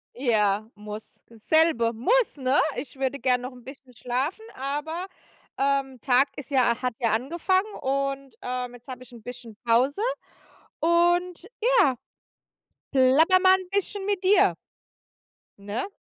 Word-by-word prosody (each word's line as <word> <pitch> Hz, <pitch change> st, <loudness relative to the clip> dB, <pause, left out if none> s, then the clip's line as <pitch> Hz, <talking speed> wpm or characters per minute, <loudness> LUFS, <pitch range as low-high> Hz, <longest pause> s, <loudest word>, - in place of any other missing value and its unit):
Ja, 215 Hz, -4 st, +1 dB
muss. 210 Hz, +1 st, -10 dB
Selbe 235 Hz, 0 st, +2 dB
muss, 440 Hz, -, +1 dB
ne? 265 Hz, +1 st, +2 dB, 0.2 s
Ich 260 Hz, +1 st, -7 dB
würde 270 Hz, +1 st, -1 dB
gern 250 Hz, -2 st, +1 dB
noch 255 Hz, +1 st, -7 dB
'n 245 Hz, -1 st, -15 dB
bisschen 265 Hz, -1 st, -13 dB
schlafen, 255 Hz, -, -3 dB
aber 295 Hz, +7 st, -4 dB, 0.5 s
Tag, 275 Hz, 0 st, +2 dB, 0.4 s
ähm, -, -, -38 dB
ist 285 Hz, -1 st, -8 dB
ja 250 Hz, -3 st, +2 dB
hat 250 Hz, -2 st, -1 dB
ja 230 Hz, -3 st, +1 dB
angefangen 345 Hz, -, 0 dB
und, 275 Hz, -1 st, -2 dB
ähm, 250 Hz, 0 st, -4 dB
jetzt 245 Hz, +1 st, -15 dB
habe 255 Hz, -1 st, -8 dB
ich 250 Hz, -, -17 dB
'n 235 Hz, -, -12 dB
bisschen 240 Hz, -1 st, -10 dB
Pause. 255 Hz, -, +2 dB, 0.8 s
Und 345 Hz, +2 st, +2 dB
ja, 465 Hz, -, +4 dB, 1.0 s
platter 280 Hz, +8 st, +5 dB
mal 375 Hz, 0 st, +6 dB
'n 375 Hz, -1 st, -7 dB
bisschen 400 Hz, 0 st, -2 dB
mit 400 Hz, -2 st, -1 dB
dir. 390 Hz, +2 st, +4 dB, 1.0 s
Ne? 205 Hz, -, -5 dB
270 Hz, 140 wpm, -25 LUFS, 245-340 Hz, 1.0 s, mal